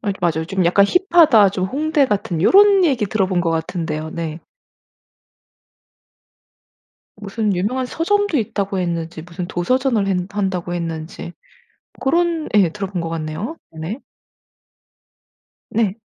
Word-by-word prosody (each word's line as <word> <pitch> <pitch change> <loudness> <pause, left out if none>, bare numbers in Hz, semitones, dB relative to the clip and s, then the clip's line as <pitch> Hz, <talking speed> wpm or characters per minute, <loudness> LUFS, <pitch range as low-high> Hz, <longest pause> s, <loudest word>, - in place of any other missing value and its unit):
맞 200 -3 -2
맞아요. 160 -1 0
좀 190 -1 0
"약간 195 +3 +4
힙하다. 330 - +5
좀 185 -1 -2
홍대 295 +3 +1
같은" 195 -6 -2
요런 395 - +6
얘기 250 -7 +1
들어본 190 -4 0
것 165 - 0
같은데요. 160 -1 -3
네. 165 0 -5 2.8
무슨 205 0 -2
"유명한 250 +8 -1
서점도 410 +3 0
있다."고 200 -3 -2
했는지 170 -2 -3
무슨 175 +1 -6
"도서전을 235 +3 0
했 190 -2 +1 0.2
한다."고 185 -3 -2
했는지 165 0 -5 0.7
고런 335 +2 +1
예. 185 -5 +4
들어본 195 -1 -4
것 165 - -3
같네요. 165 - -4 0.2
네. 160 - -5 1.7
네. 220 -1 0
195 Hz, 250 characters per minute, -19 LUFS, 170-255 Hz, 2.8 s, 요런